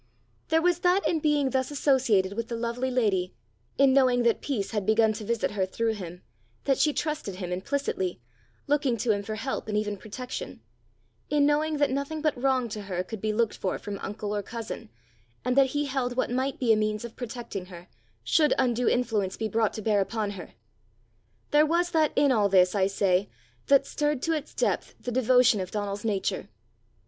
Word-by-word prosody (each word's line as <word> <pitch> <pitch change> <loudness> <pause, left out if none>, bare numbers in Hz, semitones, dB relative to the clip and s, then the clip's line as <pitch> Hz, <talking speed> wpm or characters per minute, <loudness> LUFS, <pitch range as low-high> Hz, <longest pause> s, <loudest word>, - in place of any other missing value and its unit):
There 320 +1 +2
was 350 -1 +3
that 360 +3 +2
in 325 - +1
being 295 -3 +1
thus 260 0 0
associated 255 -9 +2
with 230 +2 -3
the 235 - -4
lovely 235 +3 -2
lady; 200 - 0 0.4
in 275 -1 +5
knowing 255 -3 +4
that 235 -1 +2
peace 220 -9 -2
had 210 -3 -1
begun 220 +2 +3
to 215 +1 -7
visit 230 0 -1
her 205 -2 -1
through 225 +4 -1
him, 180 -4 -8 0.4
that 270 -1 +1
she 300 +2 +4
trusted 300 - -3
him 180 -1 -5
implicitly, 190 - -2 0.5
looking 280 -4 +1
to 225 +1 +1
him 200 -1 0
for 215 +2 -5
help 240 +1 -4
and 210 -1 -1
even 210 -1 -1
protection; 245 +6 -7 0.7
in 295 -1 +3
knowing 300 +1 +1
that 290 -2 +2
nothing 280 +3 -2
but 305 -1 +1
wrong 255 -1 +1
to 210 0 -5
her 185 -3 -3
could 205 +2 -8
be 215 - 0
looked 225 0 0
for 185 - -2
from 200 -1 -6
uncle 210 0 -4
or 205 - -1
cousin, 230 - -7 0.6
and 250 0 +1
that 275 -1 +6
he 290 +2 -1
held 260 -3 -2
what 255 - 0
might 260 +2 -1
be 235 -3 +4
a - - +4
means 215 +1 -1
of 235 - -9
protecting 235 -6 -6
her, 175 -1 -11 0.4
should 305 -2 +3
undue 245 -2 +2
influence 220 -6 0
be 220 - -1
brought 220 0 +1
to 215 - -7
bear 210 -2 +2
upon 210 +1 -2
her 185 -4 -10 1.0
there 295 +1 +6
was 340 +3 +1
that 310 -2 +3
in 285 0 +4
all 210 -5 +3
this, 185 -1 +4
I 195 -2 +2
say, 195 -1 +1 0.4
that 275 0 +5
stirred 295 -2 -1
to 330 - +1
its 305 -2 -4
depth - - -1
the 245 - -5
devotion 250 -2 +4
of 185 -1 -4
Donal's 205 -1 -3
nature. 205 -4 -1
235 Hz, 200 wpm, -27 LUFS, 205-275 Hz, 1.0 s, that